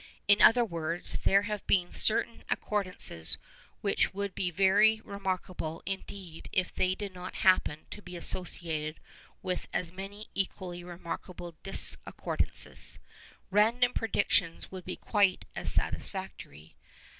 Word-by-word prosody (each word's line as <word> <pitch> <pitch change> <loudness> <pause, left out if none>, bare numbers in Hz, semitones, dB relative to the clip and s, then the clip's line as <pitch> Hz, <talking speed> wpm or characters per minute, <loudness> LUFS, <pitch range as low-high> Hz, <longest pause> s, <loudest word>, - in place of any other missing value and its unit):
In 205 0 +6
other 240 +1 +7
words, 170 -3 -3
there 200 +1 +5
have 210 0 -3
been 180 -2 +2
certain 225 +1 +1
accordances 185 - 0 0.4
which 200 -1 +1
would 200 -1 -2
be 180 - -1
very 200 +5 +5
remarkable 185 -4 -4
indeed 190 -3 -6
if 185 -1 0
they 185 0 +1
did 200 -1 -6
not 180 0 -7
happen 175 -5 +4
to 210 - -7
be 180 -2 -9
associated 165 -3 +1 0.4
with 185 -1 -2
as 170 -2 -2
many 195 +3 -8
equally 185 -2 -3
remarkable 175 0 -7
discordances. 195 - 0 0.5
Random 235 +5 +4
predictions 200 -6 0
would 185 -2 -8
be 185 - -4
quite 200 -4 +2
as - - 0
satisfactory. 75 +2 -2
185 Hz, 120 wpm, -30 LUFS, 175-200 Hz, 0.5 s, other